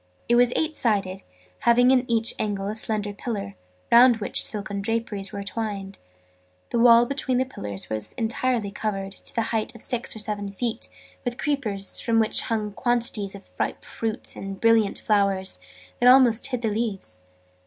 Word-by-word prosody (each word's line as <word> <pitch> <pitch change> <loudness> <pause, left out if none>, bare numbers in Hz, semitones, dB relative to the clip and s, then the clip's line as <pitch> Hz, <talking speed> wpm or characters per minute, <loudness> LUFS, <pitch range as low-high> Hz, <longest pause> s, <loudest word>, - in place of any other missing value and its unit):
It 240 - +2
was 245 0 +4
eight 315 -1 -1
sided, 195 -6 0 0.4
having 245 +2 +4
in 255 -1 +2
each 230 0 +2
angle 200 -2 -2
a 215 - -4
slender 210 -2 -3
pillar, 200 -2 -5 0.4
round 240 0 +7
which 210 - +1
silken 205 -1 -1
draperies 215 -2 -2
were 200 -1 -5
twined. 200 -1 -5 0.7
The 235 - 0
wall 235 0 +7
between 260 -1 0
the 260 - +1
pillars 100 - -2
was 110 -1 -3
entirely 230 -2 -1
covered, 195 -2 -4
to - - -8
the 230 - +1
height 220 +1 -1
of 230 - -4
six 245 -2 -2
or - - -7
seven 210 -2 -4
feet, 230 +3 -4 0.3
with 245 -1 -3
creepers, 215 -10 0
from 230 -1 +1
which 220 - +3
hung 215 -2 -2
quantities 235 -3 0
of 200 - -13
ripe - - -2
fruit 225 +1 -3
and 195 0 -6
of - - -19
brilliant 225 -3 +3
flowers, 195 - 0 0.4
that 245 - +6
almost 250 -2 +5
hid 250 -3 -4
the 225 - +1
leaves. 205 - -4
220 Hz, 175 wpm, -24 LUFS, 200-240 Hz, 0.7 s, round